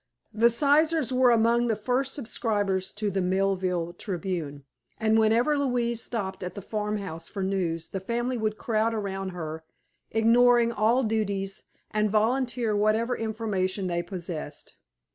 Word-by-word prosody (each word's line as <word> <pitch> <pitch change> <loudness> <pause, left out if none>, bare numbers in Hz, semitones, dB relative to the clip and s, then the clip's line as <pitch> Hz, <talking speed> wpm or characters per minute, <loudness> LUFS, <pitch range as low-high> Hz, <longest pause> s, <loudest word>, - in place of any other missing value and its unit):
The 230 +2 +5
Sizers 290 +2 +3
were 255 0 +5
among 235 +1 +3
the 225 - +1
first 255 +5 -1
subscribers 205 -7 -1
to 210 0 -2
the 190 0 0
Millville 185 -2 0
Tribune 175 -6 -4 0.4
and 220 0 +3
whenever 235 +7 +3
Louise 240 -4 0
stopped 195 -6 -4
at 180 -1 -5
the 200 - -6
farmhouse 205 -6 -4
for 195 - -4
news 175 -4 -1
the 195 - -4
family 240 +6 -2
would 215 -2 -1
crowd 225 0 0
around 195 -2 -3
her, 160 -3 -6 0.5
ignoring 235 +1 +4
all 235 +4 +2
duties, 200 -3 -1 0.3
and 215 0 +1
volunteer 235 +1 +1
whatever 215 +4 +2
information 210 -4 -2
they 175 -1 -1
possessed. 170 -4 -7
215 Hz, 140 wpm, -27 LUFS, 190-235 Hz, 0.5 s, The